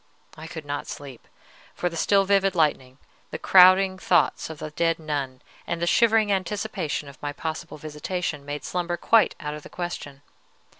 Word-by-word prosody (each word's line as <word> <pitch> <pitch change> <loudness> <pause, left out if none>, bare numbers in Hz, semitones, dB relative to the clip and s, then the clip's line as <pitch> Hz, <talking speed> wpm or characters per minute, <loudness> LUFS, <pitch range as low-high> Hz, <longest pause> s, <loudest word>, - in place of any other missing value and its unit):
I 160 +1 -9
could 160 -2 -8
not 145 0 -4
sleep; 135 -5 -9 0.5
for 180 - -1
the 170 - -4
still 195 +4 +3
vivid 195 -1 +2
lightning, 135 -5 0 0.3
the - - -5
crowding 185 +1 +6
thoughts 175 -4 +2
of 160 - -7
the 155 - -7
dead 165 +2 +1
nun, 140 -5 -4 0.2
and 170 - -2
the 170 - 0
shivering 220 +2 +3
anticipation 190 -5 -2
of 140 -2 -13
my 145 - -3
possible 160 +2 -5
visitation, 155 +1 -4
made 145 0 -6
slumber 175 +1 -2
quite 225 +4 +3
out 150 0 -4
of 150 - -7
the - - -12
question. 145 -5 -6
165 Hz, 170 wpm, -25 LUFS, 145-185 Hz, 0.5 s, crowding